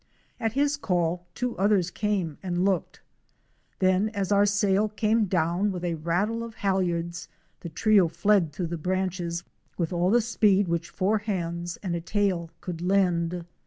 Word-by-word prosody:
At 225 -1 -1
his 285 +2 +1
call 175 - -1
two 250 -1 -2
others 195 -3 +2
came 195 -8 -2
and 180 -1 -1
looked; 195 -3 -1 0.8
then, 185 +3 +2
as 200 -1 -1
our 200 0 +5
sail 205 +1 +2
came 215 +1 +1
down 180 +2 +1
with 180 -1 -4
a 170 - 0
rattle 175 +8 -1
of 230 -1 -7
halyards, 175 -3 -1 0.3
the 170 - -7
trio 200 +2 +4
fled 190 -1 +2
through 175 +5 -3
the - - -2
branches 180 -1 -2 0.3
with 170 0 -1
all 175 +1 +1
the 235 +4 +5
speed 205 -4 +2
which 170 0 -2
four 210 +3 +1
hands 175 -4 -3
and 180 -3 -1
a 170 - -3
tail 185 -2 0
could 170 -2 -6
lend. 180 -2 +1
185 Hz, 160 wpm, -26 LUFS, 170-205 Hz, 0.8 s, our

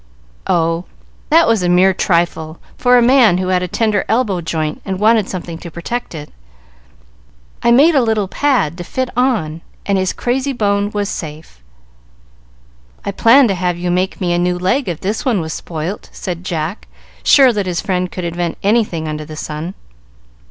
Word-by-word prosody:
"Oh, 165 +1 +1 0.4
that 330 +1 +5
was 225 -3 +2
a 175 - 0
mere 185 +2 +4
trifle 170 -3 0 0.2
for 245 0 +4
a 240 - +4
man 240 -7 +5
who 185 0 -2
had 180 -1 +2
a 180 - -2
tender 210 +1 0
elbow 220 -6 +1
joint 160 -2 -3
and 190 -1 -4
wanted 215 -1 +3
something 170 -3 -6
to 170 - -8
protect 175 +6 -5
it. 150 -1 -8 1.3
I - - +2
made 285 +8 +6
a 275 - +4
little 220 -4 0
pad 195 - 0
to - - -4
fit 260 +7 -3
on, 220 -11 0 0.2
and 200 -1 +1
his 185 -1 0
crazy 265 +3 -1
bone 205 -3 0
was 205 -1 -2
safe." 150 - -7 1.4
"I - - -1
planned 235 +5 +5
to - - +2
have 180 -1 -1
you 175 0 -2
make 185 +2 -1
me 175 -2 0
a 175 - +1
new 180 0 0
leg 185 +7 0
if 170 - -5
this 205 +4 -2
one 245 -7 +1
was 160 -1 -4
spoilt," 170 +4 -5
said 180 -2 -6
Jack, 170 +1 -4 0.3
sure 265 -4 +6
that 205 -3 -2
his 175 -2 -1
friend 180 0 -2
could 185 - -5
invent 170 0 -3
anything 200 -7 +1
under 155 0 -4
the 155 - -9
sun. 155 +4 -5
185 Hz, 180 wpm, -17 LUFS, 170-225 Hz, 1.4 s, made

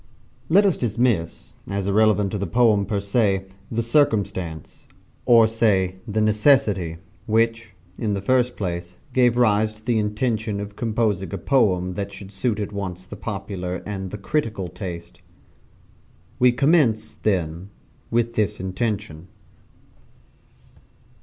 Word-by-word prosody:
Let 200 +5 +5
us 195 - +2
dismiss, 115 -7 -1 0.2
as 100 -1 -2
irrelevant 105 -1 +3
to 105 - -3
the 100 - -2
poem, 105 0 +3
per 100 -1 -1
se, 100 -2 +1 0.2
the 115 0 -1
circumstance 100 - -1 0.4
or 115 -2 +7
say 100 -5 +1
the 110 0 0
necessity 105 - +3 0.3
which, 115 -1 0 0.2
in 105 -3 0
the - - -2
first 125 +3 +1
place, 85 -2 -4 0.2
gave 120 -2 +3
rise 110 -2 +3
to 110 +1 -18
the 120 -3 +2
intention 105 0 -1
of 100 0 -7
composing 110 -5 -1
a - - -3
poem 90 -4 +1
that 100 +2 -4
should 100 0 -10
suit 105 +2 -1
at 105 -1 -3
once 95 -2 -5
the 105 - -9
popular 95 -4 -5
and 95 -2 -5
the 105 - -6
critical 105 -5 -2
taste. 85 -2 -8 1.2
We 125 0 +6
commence, 125 -5 +2
then, 90 -2 -1 0.4
with 115 0 0
this 105 -3 -1
intention. 95 -3 -3
105 Hz, 135 wpm, -23 LUFS, 95-115 Hz, 1.2 s, or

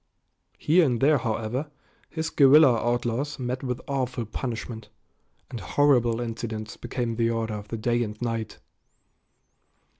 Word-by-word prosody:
Here 170 +4 +4
and 125 -6 +1
there, 145 +2 +4
however, 120 +5 -2 0.4
his 160 -1 -3
guerrilla 140 -2 +7
outlaws 120 +4 -1
met 125 0 -3
with 125 -3 -3
awful 130 -3 -2
punishment, 115 -1 -5 0.6
and 120 - -5
horrible 120 -6 +2
incidents 115 -3 -5
became 120 -2 -3
the 115 -1 +2
order 115 -1 -2
of 105 0 -6
the 115 - -4
day 120 +2 0
and 105 -2 -4
night. 115 -2 -3
120 Hz, 130 wpm, -26 LUFS, 115-135 Hz, 0.6 s, guerrilla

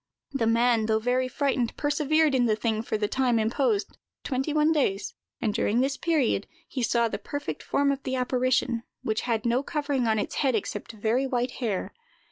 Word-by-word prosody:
The 270 -5 0
man, 230 -1 +3
though 220 -1 +3
very 250 +3 +1
frightened, 260 -3 -1
persevered 300 +1 +2
in 245 -2 +3
the 215 - +3
thing 220 0 -1
for 220 - -2
the 210 -1 0
time 250 0 +1
imposed, 220 -1 0 0.2
twenty 270 +3 -1
one 305 +1 +3
days; 240 -11 0 0.3
and 215 -3 0
during 220 +3 +1
this 270 +2 +1
period 290 -12 +1 0.2
he 260 - -4
saw 235 0 +2
the - - -4
perfect 290 0 -5
form 280 0 +1
of 275 0 -3
the 260 -1 -2
apparition, 250 -1 +1 0.2
which 220 0 0
had 225 -1 0
no 240 +2 +2
covering 285 -4 -1
on 220 -1 +2
its 210 - -3
head 265 -4 +2
except 205 +1 -4
very 225 +5 0
white 250 -1 -1
hair. 215 -6 -2
245 Hz, 190 wpm, -27 LUFS, 225-275 Hz, 0.3 s, man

